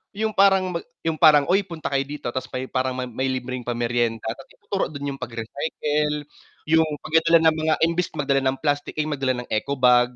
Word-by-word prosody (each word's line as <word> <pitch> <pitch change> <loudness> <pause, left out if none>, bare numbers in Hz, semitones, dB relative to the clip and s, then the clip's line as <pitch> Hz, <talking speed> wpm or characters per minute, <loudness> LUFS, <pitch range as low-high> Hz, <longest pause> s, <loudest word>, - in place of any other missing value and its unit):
yung 220 +1 -1
parang 195 -2 +4
mag - - -13 0.2
yung 160 -1 -1
parang, 150 -3 +7
"Oy 195 +2 +4
punta 170 -7 -6
kayo 135 -1 +2
dito," 145 -4 -5
tas 130 - -3
may 130 0 -4
parang 130 -1 0 0.2
may 130 +3 -1
libreng 130 -1 -3
pameryenda 120 -1 -1
tas 135 +3 -10
ituro 195 - -3
dun 145 -2 -5
yung 135 - -10
pag-recycle, 145 +5 -2 0.5
yung 160 0 +5 0.2
pagdadala 165 +1 +4
ng - - 0
mga 155 0 +2
imbes 170 +1 -1
magdala 140 -2 +1
ng 130 - -1
mga - - -33
plastic, 145 -1 -1
eh, 155 - +2
magdala 135 -4 -1
ng - - -32
eco 125 +6 -1
bag, 125 -1 +4
145 Hz, 200 wpm, -23 LUFS, 130-160 Hz, 0.5 s, parang